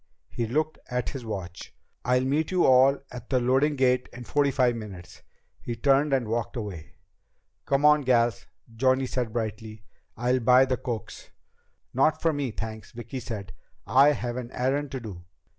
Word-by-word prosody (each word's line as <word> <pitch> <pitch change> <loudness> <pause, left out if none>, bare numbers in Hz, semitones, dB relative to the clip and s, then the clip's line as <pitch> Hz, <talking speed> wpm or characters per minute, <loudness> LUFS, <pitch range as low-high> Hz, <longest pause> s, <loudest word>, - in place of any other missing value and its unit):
He 115 - -2
looked 155 +6 -1
at 125 0 -2
his 135 -4 -7
watch. 95 -6 -7 0.3
"I'll 125 +1 +2
meet 150 +4 0
you 185 -2 +2
all 130 +2 +5
at 125 -1 -9
the 130 - +2
loading 135 +5 +2
gate 125 -1 +2
in 125 - -9
forty 145 +3 +1
five 125 -3 +2
minutes." 100 -6 -9 0.4
He 120 - -4
turned 140 +4 +2
and 130 -4 +1
walked 115 +2 -2
away. 100 -10 -6 0.7
"Come 140 +1 +2
on, 150 0 +6
gals," 120 -3 +1 0.3
Johnny 130 +2 +2
said 125 -3 -2
brightly. 110 -1 -5 0.3
"I'll 125 +3 +1
buy 125 +2 +5
the 130 -1 -1
cokes." 115 -3 -6 0.6
"Not 155 +5 +2
for 165 -1 +1
me, 145 -3 -2
thanks," 110 0 -7
Vicki 120 +2 -6
said. 105 -6 -7 0.3
"I 140 +3 +5
have 120 -3 -4
an 125 -2 -5
errand 135 +3 -1
to 130 - -3
do." 100 -7 -9
125 Hz, 170 wpm, -26 LUFS, 115-135 Hz, 0.7 s, on